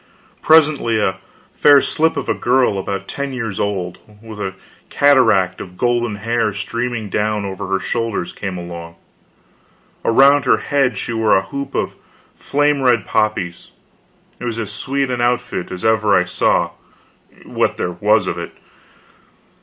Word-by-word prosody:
Presently 155 -7 +4
a 95 -2 0 0.4
fair 145 -1 +6
slip 160 +3 +1
of - - -3
a - - +2
girl, 125 -5 +1
about 100 0 -4
ten 140 -1 -4
years 115 -6 -4
old, 95 -3 -2 0.2
with 110 -1 -11
a 95 -2 -4 0.3
cataract 120 -10 +3
of 90 -1 -10
golden 120 0 0
hair 115 +1 -1
streaming 115 +2 -3
down 105 +1 -1
over 95 -1 -5
her 95 0 +1
shoulders, 115 -2 -3
came 95 -3 -5
along. 85 -1 -8 1.1
Around 140 +5 +5
her - - +4
head 135 -6 0
she 120 - -4
wore 110 -3 +3
a 95 - 0
hoop 140 +7 -6
of - - -1 0.4
flame 145 0 0
red 120 -6 +2
poppies. 105 -5 -1 0.7
It - - -6
was 115 -2 -3
as 110 -3 -4
sweet 135 +5 -1
an 120 -1 -2
outfit 120 -6 -1
as 90 +4 -6
ever 110 -2 +3
I - - +2
saw, 90 0 +1 0.7
what - - -1
there - - -2
was - - +2
of - - -3
it. - - -7
110 Hz, 155 wpm, -18 LUFS, 100-125 Hz, 1.1 s, fair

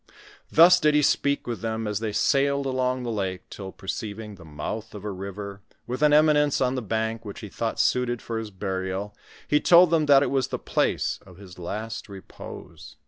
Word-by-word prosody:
Thus 175 +2 +7
did 150 -2 +3
he 150 - +4
speak 140 0 +1
with 120 -2 -4
them 110 0 -2
as 105 -1 -2
they 110 -1 -2
sailed 140 +4 +2
along 130 -1 0
the 120 - -3
lake, 95 -4 -3
till, 95 -2 -7
perceiving 105 +2 -6
the 95 -4 -13
mouth 105 +8 -6
of 100 - -8
a 105 - -2
river, 100 +1 -7 0.2
with 125 +3 -4
an 150 -1 +5
eminence 150 -1 +4
on 130 -1 +1
the 130 - -2
bank 110 +1 -2
which 100 0 -8
he 105 - -8
thought 115 +3 -3
suited 125 -1 +1
for 115 -1 -4
his 110 -1 -6
burial, 95 +1 -4 0.3
he 150 - +3
told 175 +1 +6
them 160 -3 +2
that 140 -1 +7
it - - -1
was 135 -2 +1
the - - -3
place - - 0
of 90 -2 -16
his 95 -2 -13
last 110 +6 -5
repose. 95 -1 -11
110 Hz, 200 wpm, -25 LUFS, 100-135 Hz, 0.3 s, Thus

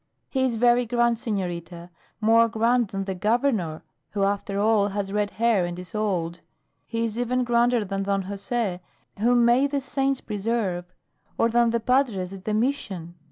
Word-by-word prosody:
"He 265 - 0
is 255 -3 +1
very 240 +1 +3
grand, 235 -1 +2
senorita; 175 -5 -4 0.3
more 230 +1 +4
grand 230 +1 +2
than 195 0 -4
the 190 0 -3
Governor, 210 - 0 0.3
who 200 -1 0
after 200 0 -1
all 210 -1 +3
has 200 -1 -3
red 210 -1 +1
hair 225 -3 +2
and 175 0 -4
is 180 -1 -10
old. 180 -5 -2 0.5
He 230 0 -1
is 225 +1 -4
even 250 +1 0
grander 240 -1 +2
than 195 0 -3
Don 195 0 0
Jose, 200 -1 -3 0.4
whom 240 +2 +4
may 245 +4 +4
the 280 0 -1
saints 270 0 -1
preserve; 200 -4 -2 0.5
or 230 - +3
than 235 0 +3
the 235 0 +1
padres 230 -7 +1
at 195 -1 -10
the 215 - -1
mission. 215 -9 -2
220 Hz, 170 wpm, -25 LUFS, 195-240 Hz, 0.5 s, more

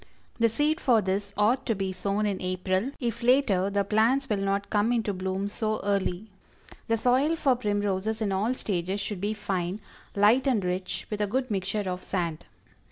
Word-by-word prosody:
The 230 0 +4
seed 295 +7 0
for 240 -4 +4
this 200 +1 -2
ought 215 +5 +3
to 225 - +1
be 195 -1 -2
sown 200 +3 -1
in 200 -2 -1
April 185 +4 -1
if 235 -2 -2
later 235 -7 +3
the 200 0 +1
plants 225 +7 +2
will 210 - 0
not 195 0 -1
come 210 +2 +2
into 225 -4 0
bloom 190 +1 -2
so 215 +1 -2
early. 200 0 -1 0.6
The 230 - +2
soil 260 +7 +2
for 275 -5 +2
Primroses 205 -1 -1
in 210 -3 -1
all 210 +6 0
stages 190 -3 -2
should 200 -2 -4
be 210 +2 -1
fine, 190 -2 -2 0.4
light 220 +7 +4
and 225 -8 +2
rich, 180 +1 -3
with 210 0 -2
a 210 - +1
good 255 +3 -1
mixture 195 +1 -1
of 180 0 -3
sand. 170 -4 -3
205 Hz, 185 wpm, -27 LUFS, 190-230 Hz, 0.6 s, The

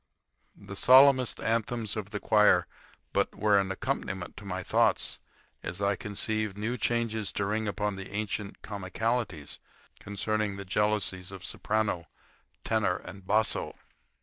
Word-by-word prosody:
The 100 - -9
solemnest 130 +2 +6
anthems 115 -1 0
of 105 -2 -4
the 105 -1 -4
choir 105 0 +4 0.5
were - - +3
but - - -20
an 100 -2 +3
accompaniment 95 -4 -3
to 105 - -9
my 95 -1 -3
thoughts - - +2 0.4
as 90 - -5
I 100 0 +2
conceived 105 0 -2
new 110 +4 -2
changes 115 -3 0
to 100 - -1
ring 110 +2 -1
upon 105 -1 -2
the 95 - -7
ancient 105 0 -4
comicalities 100 -4 -3 0.4
concerning 100 0 -2
the 100 - -6
jealousies 100 -2 0
of 95 -1 -8
soprano, 105 -6 -1 0.6
tenor, 110 -5 +1
and 95 0 -10
basso. 110 0 +2
105 Hz, 135 wpm, -29 LUFS, 100-110 Hz, 0.6 s, solemnest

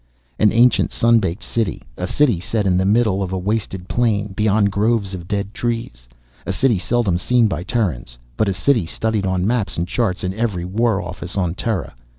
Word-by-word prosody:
An 105 - +5
ancient, 120 +2 +4
sun 115 0 +4
baked 95 -2 -3
City, 110 -10 -2
a 90 - -3
City 120 - +2
set 105 +4 -2
in 95 -2 +2
the 95 +1 +2
middle 105 -1 +2
of 95 -1 -3
a 95 - -1
wasted 95 -1 -3
plain, 105 -4 0
beyond 105 0 +2
groves 105 -1 0
of 90 -2 -7
dead 100 0 -2
trees, 115 - -4 0.3
a - - -3
City 120 -8 +2
seldom 105 -4 0
seen 120 +3 +3
by 95 - -3
Terrans 90 - -2 0.2
but 110 -2 +1
a - - 0
City 110 -1 +1
studied 110 +1 -1
on 95 -1 0
maps 110 -2 -1
and 85 +1 -1
charts 100 -3 -1
in 90 0 -1
every 100 -5 -2
War 110 +2 +1
Office 90 +2 -6
on 90 -4 0
Terra. 95 -1 -3
100 Hz, 195 wpm, -20 LUFS, 90-115 Hz, 0.3 s, An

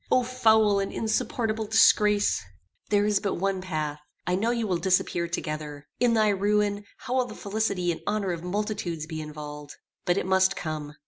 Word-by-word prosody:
O 255 - +4
foul 220 -5 +3
and 195 - -2
insupportable 220 0 -1
disgrace! 210 - +4 0.5
"There 205 -1 +3
is 210 -1 +2
but 200 - -1
one 195 +1 -1
path. 155 -5 -3 0.3
I 180 - 0
know 205 +6 +1
you 235 -1 0
will 185 -4 0
disappear 180 -2 +1
together. 150 -3 -5
In 240 -2 +3
thy 215 -1 +4
ruin, 205 +1 +1
how 250 +1 -3
will 255 - +2
the - - -9
felicity 200 -4 -1
and 165 - -5
honor 200 -3 0
of 170 -1 -5
multitudes 180 -4 -3
be 160 0 -5
involved! 150 -1 -8 0.3
But 175 - +2
it - - 0
must 190 0 +3
come. 155 -3 -5
195 Hz, 180 wpm, -26 LUFS, 170-215 Hz, 0.5 s, O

